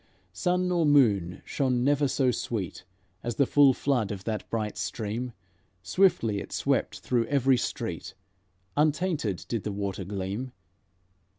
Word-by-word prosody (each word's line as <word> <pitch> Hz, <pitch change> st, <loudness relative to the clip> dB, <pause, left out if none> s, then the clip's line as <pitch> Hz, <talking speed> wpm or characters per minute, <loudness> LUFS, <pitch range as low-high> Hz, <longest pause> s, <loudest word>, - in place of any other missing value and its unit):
Sun 180 Hz, 0 st, +1 dB
nor 175 Hz, -2 st, +2 dB
moon 105 Hz, -, +3 dB
shone 125 Hz, -3 st, 0 dB
never 145 Hz, +1 st, +3 dB
so 130 Hz, -1 st, +2 dB
sweet 100 Hz, -7 st, -4 dB, 0.4 s
As 120 Hz, -, -3 dB
the 140 Hz, -, +3 dB
full 140 Hz, 0 st, +6 dB
flood 125 Hz, -5 st, 0 dB
of 95 Hz, -2 st, -5 dB
that 110 Hz, 0 st, -4 dB
bright 110 Hz, -2 st, -2 dB
stream; 115 Hz, +3 st, -3 dB, 0.5 s
Swiftly 115 Hz, -, +2 dB
it -, -, -8 dB
swept -, -, 0 dB
through 120 Hz, -3 st, 0 dB
every 135 Hz, -1 st, +3 dB
street, -, -, -4 dB, 0.6 s
Untainted 150 Hz, -, 0 dB
did 115 Hz, -3 st, -2 dB
the 105 Hz, -, -2 dB
water 100 Hz, -1 st, -3 dB
gleam. 100 Hz, +6 st, -4 dB
120 Hz, 135 wpm, -28 LUFS, 105-145 Hz, 0.6 s, full